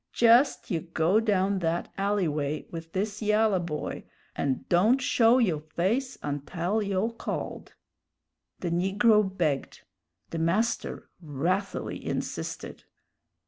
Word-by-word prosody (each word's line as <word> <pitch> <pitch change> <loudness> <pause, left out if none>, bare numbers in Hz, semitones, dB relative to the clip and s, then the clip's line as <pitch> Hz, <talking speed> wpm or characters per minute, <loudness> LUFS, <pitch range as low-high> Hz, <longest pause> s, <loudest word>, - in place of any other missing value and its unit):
Jest 240 +4 +4
you 170 - +1
go 170 +4 +2
down 200 -3 +1
that 170 0 -2
alley 200 -2 +1
way 150 0 -2
with 165 -1 -7
this 205 +3 -2
yalla 210 -2 +3
boy, 160 -3 -4 0.3
and 135 -2 -2
don't 210 +10 +4
show 240 -1 +4
yo' 185 -12 +2
face 190 - -1
untell 165 +8 -2
yo' 200 +3 0
called!" 230 - -5 0.9
The 175 - -2
negro 200 +5 +4
begged; 175 -8 -2 0.5
the 165 - -3
master 190 +8 -1
wrathily 170 +6 -2
insisted. - - -4
190 Hz, 115 wpm, -27 LUFS, 165-215 Hz, 0.9 s, Jest